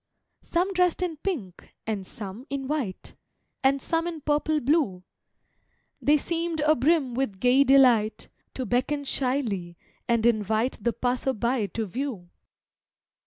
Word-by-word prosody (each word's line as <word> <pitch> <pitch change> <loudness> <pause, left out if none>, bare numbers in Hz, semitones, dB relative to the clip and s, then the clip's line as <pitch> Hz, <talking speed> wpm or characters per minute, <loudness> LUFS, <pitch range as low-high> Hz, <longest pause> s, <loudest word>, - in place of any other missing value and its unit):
Some 360 +3 0
dress'd 360 -1 +2
in 335 -3 -3
pink, 275 - -5
and 205 -4 -3
some 215 +5 -8
in 275 -1 -3
white, 275 -10 -3 0.5
And 275 +1 +3
some 330 +5 -1
in 330 -3 -5
purple 300 +1 +1
blue, 255 - +1 1.0
They 295 +1 +4
seemed 335 +2 -2
abrim 300 -2 +3
with 235 -6 -2
gay 250 +4 +5
delight, 250 -6 +4 0.3
To 260 - -3
beckon 255 +6 0
shyly, 240 -11 -2 0.3
and 235 -2 +2
invite 220 +1 +1
The 235 0 +1
passer 250 +2 -1
by 235 -1 0
to 225 +2 -3
view. 210 -5 -5
260 Hz, 130 wpm, -26 LUFS, 220-300 Hz, 1.0 s, gay